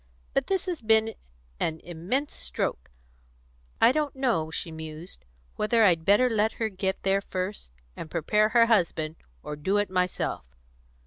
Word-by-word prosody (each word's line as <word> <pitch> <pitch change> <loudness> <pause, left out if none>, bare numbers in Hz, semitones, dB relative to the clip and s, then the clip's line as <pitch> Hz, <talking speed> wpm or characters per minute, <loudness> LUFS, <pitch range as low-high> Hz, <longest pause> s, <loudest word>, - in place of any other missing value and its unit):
But 270 - +1
this 385 -1 0
has 355 -6 -3
been 220 0 +3 0.5
an 160 0 -1
immense 185 - -2
stroke. 60 0 -3 0.9
I 235 - +7
don't 295 0 -1
know," 235 -13 0
she 165 +1 -4
mused, 160 - -7 0.3
"whether 225 +1 +3
I'd 170 -5 +4
better 205 +6 +5
let 220 -2 +1
her 225 -1 -1
get 190 -1 -3
there 195 0 +2
first 185 - -4 0.3
and 160 - -7
prepare 210 +7 +2
her 230 0 +5
husband, 170 -8 +1 0.3
or 150 - -5
do 190 +8 0
it 205 -2 0
myself. 180 - -1
200 Hz, 150 wpm, -27 LUFS, 165-225 Hz, 0.9 s, I